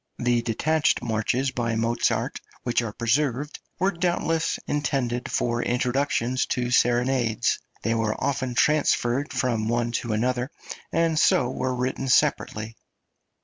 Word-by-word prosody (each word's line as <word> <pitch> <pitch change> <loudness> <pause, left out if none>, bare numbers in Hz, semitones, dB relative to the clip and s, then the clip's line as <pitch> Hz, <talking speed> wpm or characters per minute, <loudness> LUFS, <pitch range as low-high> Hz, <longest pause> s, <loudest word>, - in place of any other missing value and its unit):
The 120 -1 +1
detached 145 +6 +1
marches 120 +4 0
by 115 -3 -1
Mozart 115 +1 0 0.2
which 120 -1 +1
are 115 -3 -4
preserved 130 +5 -1 0.2
were 190 +2 +2
doubtless 165 -2 0
intended 135 -4 -1
for 120 -1 0
introductions 125 0 0
to 125 -1 -1
serenades; 120 -1 +2 0.2
they 115 - +1
were 115 -1 0
often 130 -2 -2
transferred 140 -2 +2
from 115 -4 0
one 120 0 0
to 115 - -4
another, 125 +3 0 0.4
and 165 -1 +2
so 125 - +3
were 130 -1 -2
written 130 +2 -2
separately. 110 -3 +1
125 Hz, 125 wpm, -25 LUFS, 115-140 Hz, 0.4 s, so